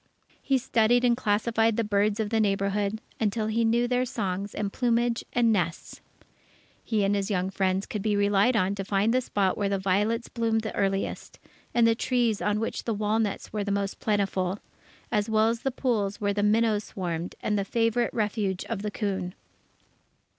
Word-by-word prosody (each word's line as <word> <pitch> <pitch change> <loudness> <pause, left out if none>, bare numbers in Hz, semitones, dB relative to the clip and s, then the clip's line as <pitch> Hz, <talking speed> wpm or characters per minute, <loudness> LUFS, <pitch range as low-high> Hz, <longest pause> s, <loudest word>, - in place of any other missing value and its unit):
He 270 - +2
studied 240 -1 +2
and 240 -1 +4
classified 225 0 +1
the 230 - +2
birds 205 0 +1
of 215 -1 -1
the 225 - +2
neighbourhood, 200 0 0 0.2
until 215 0 0
he 220 +2 +1
knew 235 +2 +2
their 250 0 +1
songs 200 -4 -3
and 205 -1 -3
plumage 240 -1 +1
and 230 -2 +3
nests. 170 -4 -3 0.8
He 215 -3 0
and 195 +1 +2
his 200 0 -1
young 190 -1 -1
friends 190 0 0
could 215 -6 -4
be 210 0 +1
relied 205 +4 +3
on 195 -2 +2
to 200 -1 -4
find 200 +3 +1
the 255 - +3
spot 200 -6 0
where 200 -1 +1
the 200 - +1
violets 205 +5 0
bloomed 225 -1 0
the 220 - -5
earliest, 195 0 -2 0.3
and 235 -1 +3
the 230 - +5
trees 235 -2 0
on 210 0 +1
which 225 - -3
the 230 - -1
walnuts 210 0 -1
were 210 -1 -1
most 200 0 -2
plentiful, 195 -3 0 0.5
as 210 -1 0
well 220 0 +3
as 230 0 -1
the 270 - -1
pools 220 -6 -1
where 205 -1 0
the 205 - -1
minnows 215 0 +2
swarmed, 175 -2 -4
and 210 - -1
the 200 - +1
favourite 230 +3 +1
refuge 210 -4 -1
of 225 -4 -4
the 210 - -2
coon. 195 -4 -3
210 Hz, 185 wpm, -27 LUFS, 200-230 Hz, 0.8 s, the